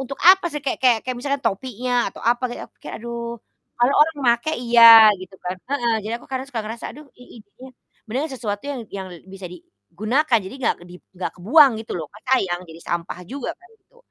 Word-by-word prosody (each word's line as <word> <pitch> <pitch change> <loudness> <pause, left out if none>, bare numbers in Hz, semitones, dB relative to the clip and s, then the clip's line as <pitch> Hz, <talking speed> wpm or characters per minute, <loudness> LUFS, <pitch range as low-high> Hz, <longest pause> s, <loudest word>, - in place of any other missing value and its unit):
untuk 270 +1 -6
apa 385 -1 +4
sih, 295 -1 -5
kayak 265 - -1
kayak 245 -3 +5
kayak 255 -1 -3
misalkan 280 +1 -2
topinya 245 +3 -1
atau - - -13
apa 240 +2 +1
gitu, - - -7
aku - - -47
kayak - - -7
aduh 235 0 -5 0.6
kalau 245 +3 +3
orang 320 0 -1 0.2
makai 310 +7 -3
iya 235 -1 +4 0.4
gitu 185 +1 -11
kan 180 +1 -3
heeh. 240 -5 +1
Jadi, 215 +2 -5
aku - - -17
kadang 260 0 -3
suka 245 -5 -4
ngerasa 225 +2 -7
aduh 300 - -12
ih 250 - -15
ih - - -12
dia 255 +6 -14 0.4
beneran 265 +8 -3
sesuatu 210 -6 -4
yang 275 -3 -4 0.2
yang 190 -1 -6 0.3
bisa 195 -1 -8
digunakan. 215 - -1
Jadi 190 - -8
gak - - +3 0.2
di - - -11 0.3
gak - - -3
kebuang 275 - +6
gitu 225 - -8
loh, 160 - -5
kan 210 - -15
sayang 180 -8 -1
jadi 160 +1 -12
sampah 170 0 -3
juga 270 +5 -5
kan 360 +1 -21
itu, 410 +5 -33
240 Hz, 215 wpm, -22 LUFS, 205-270 Hz, 0.6 s, kebuang